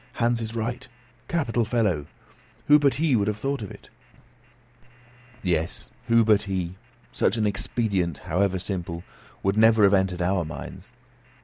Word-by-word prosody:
"Hans 120 0 +1
is 110 0 -5
right. 120 +3 -3 0.4
Capital 130 -8 0
fellow! 105 - 0 0.6
Who 150 +1 +7
but 140 -2 +3
he 150 -2 +2
would 105 -2 +1
have 105 -1 -1
thought 135 +4 -2
of 100 - -6
it?" - - -14 1.5
Yes; 85 -3 -1 0.2
who 115 -1 +4
but 105 -2 +4
he? 95 -3 -3 0.4
Such 105 - +1
an 110 - +1
expedient, 100 -3 -1
however 95 +2 +1
simple, 90 -2 -4 0.4
would 95 +2 +1
never 110 -1 +5
have 100 0 +6
entered 95 -1 +2
into 90 - 0
our 95 -1 +1
minds. 80 +1 -9
105 Hz, 150 wpm, -25 LUFS, 95-115 Hz, 1.5 s, Who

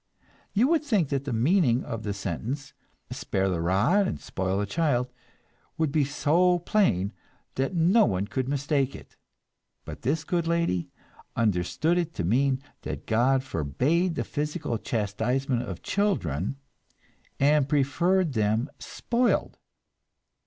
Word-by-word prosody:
You 225 +5 +4
would 325 -2 +2
think 210 - +1
that 140 -1 -1
the 140 - -3
meaning 125 - +3
of 115 -2 -5
the 105 - -3
sentence, 105 - -4 0.4
"Spare 95 0 -1
the 85 -3 -1
rod 105 - +3
and - - -3
spoil 95 0 -2
the 105 - 0
child," 125 -1 0 0.7
would 160 -3 +1
be 150 -1 +2
so 165 +5 +2
plain 165 - +1 0.4
that 135 +7 -1
no 180 +7 +5
one 95 -2 0
could 130 +4 -3
mistake 140 -1 0
it; - - -13 0.7
but - - -8
this 150 +5 0
good 170 0 -1
lady 170 - 0 0.5
understood 115 - +1
it 170 -1 -3
to 90 - -2
mean 130 +8 +1 0.2
that - - -6
God 130 +4 +2
forbade 140 - 0
the - - -1
physical 150 -5 -3
chastisement 120 +5 -1
of 100 -8 -7
children, 135 - 0 0.8
and 145 0 +3
preferred 155 +5 +2
them 110 +4 0
"spoiled." 240 +1 -1
135 Hz, 135 wpm, -27 LUFS, 110-165 Hz, 0.8 s, no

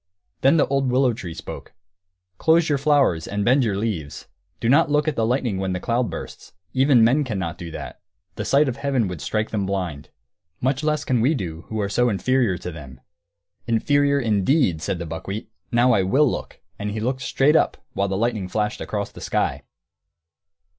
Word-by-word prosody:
Then 135 +5 +5
the 150 - +4
old 135 -1 0
willow 130 -1 +3
tree 85 -7 -7
spoke: - - -9 0.7
"Close 160 0 +3
your 145 -2 +1
flowers 140 - +2
and 100 0 -2
bend 130 +3 +4
your 105 -4 0
leaves. 95 -10 -4 0.3
Do - - -1
not 140 +4 +4
look 150 +1 +2
at 155 - 0
the 110 -1 +1
lightning 120 -5 0
when 95 -1 -1
the 90 - -2
cloud 120 +4 0
bursts. - - -8 0.2
Even 130 -3 +5
men 130 +6 +4
cannot 95 - -4
do 85 - -6
that; - - -8 0.3
the - - -4
sight 140 +2 +3
of 130 -1 -2
heaven 135 -6 0
would 90 -4 -6
strike 110 0 -2
them 100 -3 -1
blind. 90 -7 -3 0.5
Much 130 +3 0
less 150 -1 0
can 125 -3 +1
we 140 +7 +3
who 85 +5 -5
are 100 - 0
so 120 +5 +2
inferior 115 -1 +1
to 90 +1 -6
them!" 70 -6 -11 0.7
"'Inferior,' 140 +5 +2
indeed!" 110 - +2
said 90 - -2
the 85 - -5
buckwheat. 95 +7 -6 0.2
"Now 120 +2 +4
I 105 -5 +4
will 130 +11 +3
look!" - - -5 0.2
And 105 0 -3
he 105 +1 -3
looked 130 +4 -2
straight 140 +4 +2
up, - - +2 0.2
while 100 - 0
the 95 0 -2
lightning 110 -3 -1
flashed 105 +1 -2
across 100 -1 -3
the - - -12
sky. - - -1
115 Hz, 195 wpm, -23 LUFS, 95-135 Hz, 0.7 s, Then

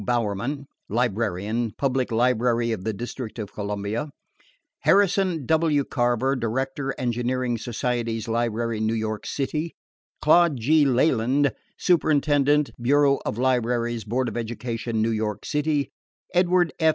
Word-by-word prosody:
Bowerman, 120 +4 -1 0.2
Librarian, 110 0 -1
Public 130 -3 0
Library 120 0 +2
of 110 -5 -3
the 110 - -1
District 120 +2 -6
of 105 -3 -6
Columbia; 105 +6 -3 0.7
Harrison 190 -6 +2
W. 160 -2 +2
Craver, 125 +1 0
Director, 135 +4 -2
Engineering 125 0 -1
Societies 115 -1 -2
Library, 115 -1 -1
New 110 +1 0
York 110 -1 -3
City; 155 +4 -3 0.4
Claude 165 -1 +4
G. 150 +6 +4
Leland, 130 +1 +2 0.2
Superintendent, 150 -3 +2
Bureau 140 +2 +3
of 105 - -2
Libraries, 120 -2 0
Board 125 +5 -1
of - - -5
Education, 115 -1 -3
New 115 - +1
York 110 -2 -2
City; 150 -1 0 0.4
Edward 180 -1 +3
F. 160 - +4
125 Hz, 120 wpm, -24 LUFS, 115-145 Hz, 0.7 s, Claude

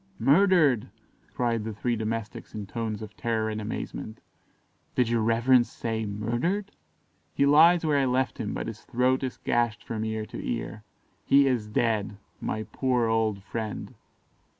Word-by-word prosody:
"Murdered!" 150 - +4 0.4
cried 115 -3 0
the 110 -1 -5
three 120 +3 -1
domestics 110 -1 -4
in 105 -2 -4
tones 110 +1 -4
of 110 0 -10
terror 110 -2 -1
and 110 0 -4
amazement; 110 +1 -5 0.8
"did 125 - +3
your 115 -1 +2
reverence 120 +2 +4
say 110 -2 -3
'murdered'?" 120 - -2 0.6
"He 140 - +3
lies 165 +4 +6
where 150 -2 +3
I 135 - +2
left 130 0 0
him, - - -2
but - - -3
his - - -7
throat 130 +2 +1
is 130 -2 -3
gashed 120 -1 0
from 110 -1 -4
ear 110 -1 -2
to - - -8
ear 110 -2 -4 0.4
he 140 0 +5
is 125 -5 0
dead. 105 -2 0 0.2
My 110 - -3
poor 125 0 0
old 110 -3 0
friend!" 110 0 -5
115 Hz, 155 wpm, -27 LUFS, 110-130 Hz, 0.8 s, lies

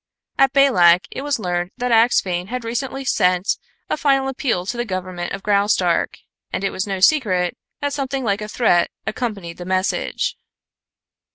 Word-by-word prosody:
At 270 -1 +5
Balak 190 -11 +5
it - - -5
was 290 0 -1
learned 180 -3 -2
that 250 0 -1
Axphain 195 -6 +3
had 250 +2 -4
recently 265 +4 -3
sent 180 -5 +1 0.3
a - - 0
final 275 -3 +2
appeal 240 -9 -1
to 240 - -3
the 240 - -1
government 185 -4 -4
of 195 0 -5
Graustark, 200 -4 +2 0.3
and - - -3
it 195 - 0
was 190 - -3
no 195 -1 -2
secret 185 - +3 0.3
that 285 -1 -1
something 270 -1 -2
like 205 -2 0
a 210 - -4
threat 210 -6 +2 0.2
accompanied 200 -8 -4
the 175 - -7
message. 190 - -1
210 Hz, 165 wpm, -20 LUFS, 180-260 Hz, 0.3 s, At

